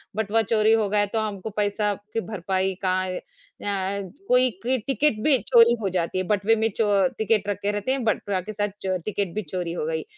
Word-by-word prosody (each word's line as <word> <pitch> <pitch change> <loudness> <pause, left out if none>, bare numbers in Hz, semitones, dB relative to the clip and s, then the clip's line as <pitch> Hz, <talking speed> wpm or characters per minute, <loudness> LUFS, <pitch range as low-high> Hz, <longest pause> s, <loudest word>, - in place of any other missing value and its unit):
बटवा 220 +1 +1
चोरी 220 0 +3
हो 215 -2 +2
गया 210 +1 +2
है 205 - +3
तो 225 - +2
हमको 210 -1 -4
पैसा 205 0 +1 0.2
की 225 - +1
भरपाई 190 -2 -1
का 185 0 +2
अ, 185 - -3 1.2
कोई 250 0 +4 0.2
क 255 +1 +1
टिकट 270 -4 +1
भी 290 -4 +5
चोरी 235 -2 +5
हो 195 - 0
जाती 180 -1 -1
है। 185 - +1
बटवे 210 +2 +3
में 220 +1 +1
चो 205 -1 +3
टिकट 215 -2 +1
रखे 205 +1 -1
रहते 205 +5 -2
हैं 265 -1 -1
बटवा 205 -3 0
के 215 +4 -7
साथ 205 0 0
च 185 -1 -1
टिकट 200 -4 -2
भी 215 - 0
चोरी 175 -1 -4
हो 155 - -3
गई। 160 0 -2
210 Hz, 210 wpm, -24 LUFS, 190-225 Hz, 1.2 s, भी